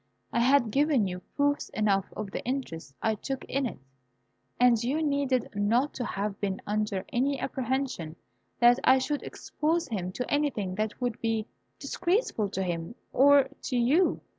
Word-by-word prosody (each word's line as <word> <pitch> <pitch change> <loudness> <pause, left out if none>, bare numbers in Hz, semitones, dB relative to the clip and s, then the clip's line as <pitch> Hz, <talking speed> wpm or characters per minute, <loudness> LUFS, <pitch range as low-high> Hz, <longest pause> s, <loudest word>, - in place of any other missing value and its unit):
I - - +2
had 245 -2 +4
given 280 -5 +3
you 180 0 -4 0.2
proofs 285 0 +1
enough 200 -2 +1
of 210 -2 -4
the - - -4
interest 165 - -4
I 220 - +2
took 265 +5 -5
in 275 -1 -1
it, - - -8 0.8
and 240 -2 +5
you 285 +6 0
needed 280 -4 +1
not 225 +8 +1
to 250 - -4
have 200 -1 -3
been 195 -2 -1
under 210 -2 -1
any 270 +3 +1
apprehension 255 - -2 0.4
that 240 +1 +6
I 260 - +6
should 290 +2 -1
expose 325 +2 -2
him 185 -5 -3
to 250 - -3
anything 280 -11 0
that 215 +2 -3
would 245 -3 -2
be 225 -1 0 0.3
disgraceful 345 - 0
to 190 0 -2
himself 170 +3 -4 0.2
or 280 +1 +6 0.2
to 250 - -1
you. 285 +10 +3
245 Hz, 165 wpm, -28 LUFS, 205-280 Hz, 0.8 s, that